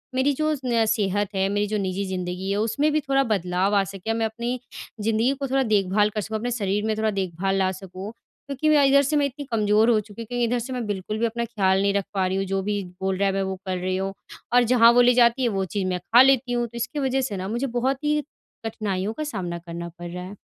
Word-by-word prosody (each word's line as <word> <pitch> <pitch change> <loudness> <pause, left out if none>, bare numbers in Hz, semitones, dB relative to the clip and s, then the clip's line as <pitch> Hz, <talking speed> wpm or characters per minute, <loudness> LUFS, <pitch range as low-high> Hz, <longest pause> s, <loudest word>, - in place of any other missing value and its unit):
मेरी 260 +2 +3
जो 310 +3 0
न 230 -2 +2
सेहत 205 -2 0
है, 190 0 +2
मेरी 205 +1 0
जो 215 +1 -1
निजी 195 0 -2
ज़िंदगी 185 0 -4
है 200 - 0
उसमें 280 +8 +1
भी 305 - +2
थोड़ा 275 0 +2
बदलाव 190 -2 0
आ 200 - +4
सके 195 +3 -4
मैं 225 0 0
अपनी 235 +3 -3 0.4
ज़िंदगी 225 +5 +2
को 275 - -2
थोड़ा 270 +1 +1
देखभाल 210 -2 +2
कर 210 0 -3
सकूँ। 220 +1 -3
अपने 245 +3 -3
शरीर 210 -2 -1
में 220 -1 0
थोड़ा 220 0 +1
देखभाल 195 0 -1
ला 190 -1 +2
सकूँ 190 +1 -8
क्योंकि 275 +5 -5
मैं 295 -2 +5
इधर 280 +1 +6
से 285 +2 0
मैं 290 - +3
इतनी 280 +1 -5
कमजोर 215 0 +3
हो 225 -2 +4
चुकी 210 +2 -9
हूँ - - -6
क्योंकि 245 +1 -1
इधर 240 +1 0
से 255 +2 -5
मैं 245 -3 -3
बिल्कुल 205 +1 -3
भी 235 - +2
अपना 235 +1 -2
ख़्याल 195 -4 +1
नहीं 200 0 +2
रख 200 -1 0
पा 190 -2 +1
रही 190 +1 -1
हूँ 195 - -1
जो 195 - +1
भी 205 0 -1 0.2
बोल 190 0 0
रहा 200 +1 +2
है 195 - 0
मैं 195 - 0
वो 190 0 -3
कर 185 -1 -2
रही 185 +1 -1
हूँ, 195 0 -2 0.4
और 245 0 +6
जहाँ 235 -1 +6
वो 245 +1 +5
ले 245 0 +5
जाती 240 +1 +4
है 240 - +3
वो 190 - 0
चीज़ 190 0 -2
मैं 180 -1 -1
खा 230 +7 +5
लेती 265 -2 +4
हूँ। 240 0 0
तो 235 +1 -10
इसकी 235 +5 -3
वजह 265 -1 +1
से 200 - -4
ना 185 +1 -4
मुझे 240 +6 -2
बहुत 265 +3 -1
ही 300 0 +1 0.4
कठिनाइयों 210 -2 -2
का 310 - -4
सामना 185 -11 -4
करना 170 0 -7
पड़ 175 0 -6
रहा 180 0 -6
है। 195 +2 -9
215 Hz, 265 wpm, -24 LUFS, 195-245 Hz, 0.4 s, इधर